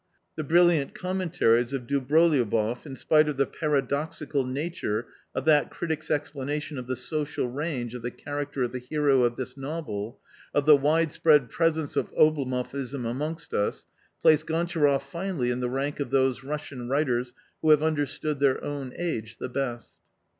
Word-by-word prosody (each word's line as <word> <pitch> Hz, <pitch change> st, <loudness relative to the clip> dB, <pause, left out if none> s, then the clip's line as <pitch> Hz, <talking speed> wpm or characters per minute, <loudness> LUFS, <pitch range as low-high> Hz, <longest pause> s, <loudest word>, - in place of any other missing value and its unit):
The 155 Hz, -, -3 dB
brilliant 165 Hz, -2 st, +3 dB
commentaries 165 Hz, -10 st, +1 dB
of 130 Hz, -3 st, -3 dB
Dobroliouboff, 130 Hz, -4 st, +2 dB
in 135 Hz, -, -7 dB
spite 155 Hz, +4 st, +3 dB
of 145 Hz, -, -3 dB
the 140 Hz, -, +3 dB
para 150 Hz, -3 st, 0 dB
doxical 140 Hz, -1 st, -2 dB
nature 135 Hz, -7 st, -2 dB, 0.3 s
of 130 Hz, -, -2 dB
that 150 Hz, -2 st, +4 dB
critic's 160 Hz, -2 st, -4 dB
explanation 145 Hz, 0 st, -2 dB
of 125 Hz, -, -8 dB
the 130 Hz, -, -1 dB
social 145 Hz, +2 st, -2 dB
range 130 Hz, -3 st, -3 dB
of 125 Hz, -, -6 dB
the 120 Hz, -, -3 dB
character 145 Hz, 0 st, -4 dB
of 120 Hz, -, -1 dB
the 125 Hz, -, -4 dB
hero 140 Hz, +1 st, +2 dB
of 120 Hz, -1 st, +2 dB
this 130 Hz, 0 st, -5 dB
novel, 135 Hz, -6 st, -5 dB, 0.4 s
of 145 Hz, -, +2 dB
the 150 Hz, -1 st, +9 dB
widespread 150 Hz, -2 st, +3 dB
presence 160 Hz, -1 st, 0 dB
of -, -, -1 dB
Oblomovism 135 Hz, -3 st, +1 dB
amongst 150 Hz, +6 st, -4 dB
us, 105 Hz, -, -1 dB, 0.4 s
placed 155 Hz, 0 st, +5 dB
Gontcharoff 160 Hz, -4 st, +1 dB
finally 165 Hz, -3 st, -2 dB
in 125 Hz, -, -2 dB
the 125 Hz, -1 st, -1 dB
rank 140 Hz, +3 st, -2 dB
of 140 Hz, -, -2 dB
those 130 Hz, -1 st, +2 dB
Russian 140 Hz, -3 st, -5 dB
writers 125 Hz, -3 st, 0 dB, 0.3 s
who 155 Hz, -, +2 dB
have 150 Hz, 0 st, +6 dB
under 155 Hz, -2 st, +1 dB
stood 150 Hz, +1 st, -3 dB
their 140 Hz, -2 st, +2 dB
own 140 Hz, -3 st, -4 dB
age 115 Hz, -10 st, -3 dB
the -, -, -5 dB
best. 120 Hz, -2 st, -4 dB
140 Hz, 165 wpm, -27 LUFS, 125-155 Hz, 0.4 s, the